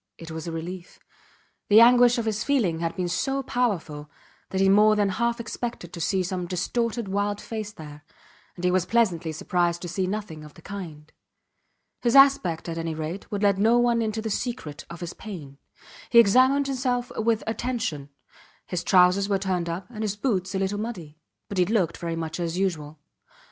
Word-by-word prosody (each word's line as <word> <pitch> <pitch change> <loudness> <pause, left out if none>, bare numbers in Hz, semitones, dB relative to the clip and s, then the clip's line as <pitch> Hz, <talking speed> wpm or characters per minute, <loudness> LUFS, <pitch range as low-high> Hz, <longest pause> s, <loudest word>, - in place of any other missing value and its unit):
It 165 0 -10
was 160 +1 -6
a - - -3
relief. 175 +2 -7 0.7
The 210 +1 +8
anguish 245 +1 +6
of 235 - -1
his 215 -1 -1
feeling 215 - +1
had 165 0 -2
been 180 -1 -2
so 270 +10 -1
powerful 165 - -2 0.4
that 190 - -2
he 195 - +4
more 210 +2 +5
than 205 -1 +2
half 235 +4 -1
expected 235 -6 -5
to 170 - -6
see 190 +2 +1
some 180 -1 -3
distorted 230 +5 -2
wild 205 +1 -1
face 215 -2 -5
there, 150 -5 -11 0.5
and 180 - -5
he 180 - +3
was 185 -1 +1
pleasantly 180 -8 +1
surprised 175 +2 0
to - - -4
see 185 +2 -2
nothing 190 -6 -5
of 150 -1 -13
the - - -15
kind. 160 -7 -8 0.9
His 240 +1 +1
aspect, 270 -14 +5
at 165 0 -4
any 165 -1 -3
rate, 160 +5 -5
would 205 0 -2
let 200 -1 +3
no 225 +4 +4
one 240 -1 +3
into 220 0 -2
the 220 - -3
secret 200 - -4
of 170 0 -9
his 175 0 -5
pain. 150 -10 -9 0.5
He 235 - +3
examined 255 +6 +5
himself 250 -2 -1
with 225 0 +1
attention. 225 - -3 0.6
His 180 -2 -3
trousers 185 +2 +4
were 200 - +2
turned 185 -3 -2
up, 175 +3 -4
and 215 -2 -7
his 210 -2 -1
boots 195 -5 -1
a - - +1
little 195 +1 -1
muddy, 175 -9 -6 0.3
but 200 - -3
he 180 - +4
looked 190 -6 0
very 170 -1 -4
much 165 +1 -4
as 170 0 -2
usual. 160 -6 -2
195 Hz, 190 wpm, -25 LUFS, 170-225 Hz, 0.9 s, The